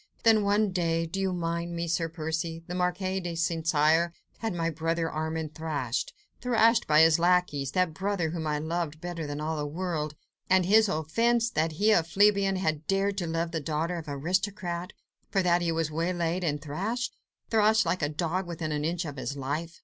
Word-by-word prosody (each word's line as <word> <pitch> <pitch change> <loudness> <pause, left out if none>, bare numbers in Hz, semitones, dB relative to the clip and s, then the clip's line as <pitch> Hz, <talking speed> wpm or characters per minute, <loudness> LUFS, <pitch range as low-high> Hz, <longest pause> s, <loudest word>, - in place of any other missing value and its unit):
Then 225 -2 +6
one 205 0 +2
day—do 165 0 -1
you 190 -1 0
mind 170 -1 -2
me, 170 0 -2
Sir 165 0 0
Percy? 165 0 -3
the 175 - -6
Marquis 185 +1 -1
de 175 -2 -4
St. 165 -1 -1
Cyr 160 +2 +3 0.3
had 225 -1 -2
my 165 -2 -1
brother 165 +1 -1
Armand 160 0 -3
thrashed—thrashed 220 - 0
by 155 0 +6
his 160 0 +5
lacqueys—that 175 -2 +2
brother 190 -3 -1
whom 160 -2 -3
I 150 0 0
loved 160 0 -3
better 170 -2 -5
than 145 0 -4
all 155 +1 -2
the 145 0 -2
world! 155 -2 -3 0.3
And 185 -1 +4
his 215 +2 +5
offence? 230 +9 +1
That 160 -3 0
he, 210 +7 +3
a 190 - +5
plebeian, 195 +3 +3
had 155 -5 -1
dared 195 +1 +1
to 175 - -2
love 165 +1 -1
the 165 - -1
daughter 160 +4 -2
of 160 - -10
the 145 - -3
aristocrat; 180 +3 -2 0.4
for 195 -2 +1
that 175 0 +3
he 170 -1 0
was 165 -1 -1
waylaid 170 +2 -1
and 150 -3 0
thrashed... 200 - -3 0.4
thrashed 220 -1 +4
like 170 +2 0
a 145 - +1
dog 175 +4 -2
within 165 -2 -4
an 150 0 -1
inch 170 +2 -1
of 145 -2 -6
his 140 +2 -4
life! 155 +5 -4
170 Hz, 190 wpm, -28 LUFS, 160-185 Hz, 0.4 s, Then